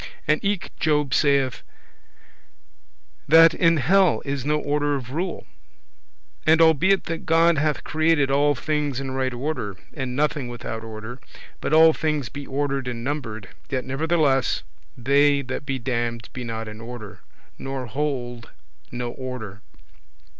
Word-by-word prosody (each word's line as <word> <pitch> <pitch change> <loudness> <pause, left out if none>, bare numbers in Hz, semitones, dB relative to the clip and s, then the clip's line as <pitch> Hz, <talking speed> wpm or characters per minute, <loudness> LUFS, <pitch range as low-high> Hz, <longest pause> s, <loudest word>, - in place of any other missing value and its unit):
And 150 +1 +2
eke 200 -2 -1
Job 150 -3 +1
saith, 140 -4 +2 1.7
that 165 +2 +7
in 165 -1 +3
hell 180 +5 +3
is 140 -2 -3
no 150 +2 +1
order 145 0 0
of 130 -2 -6
rule. 175 +5 -3 1.0
And 160 +1 +4
albeit 165 +4 +4
that 165 -1 -5
God 165 -1 +4
hath 150 -1 0
created 155 -3 +2
all 145 +1 +3
things 145 -1 -1
in 135 -1 -4
right 130 0 -1
order, 120 -6 -4 0.2
and 130 -4 -4
nothing 145 -2 0
without 120 -2 -6
order, 110 +3 -8 0.4
but - - -3
all 160 +1 +7
things 150 -7 -1
be 140 +1 -8
ordered 140 -1 -2
and 120 -2 -4
numbered, 115 -8 -4 0.2
yet 130 -2 -2
nevertheless 140 -1 +1 0.3
they 140 +3 +3
that 130 +2 -5
be 135 -1 -1
damned 120 -2 -3
be 125 - -5
not 115 -1 -5
in 110 +1 -9
order, 115 -3 -9 0.4
nor 135 -1 -4
hold 120 -2 -3 0.4
no 120 0 -4
order. 120 -6 -7
140 Hz, 140 wpm, -23 LUFS, 125-150 Hz, 1.7 s, that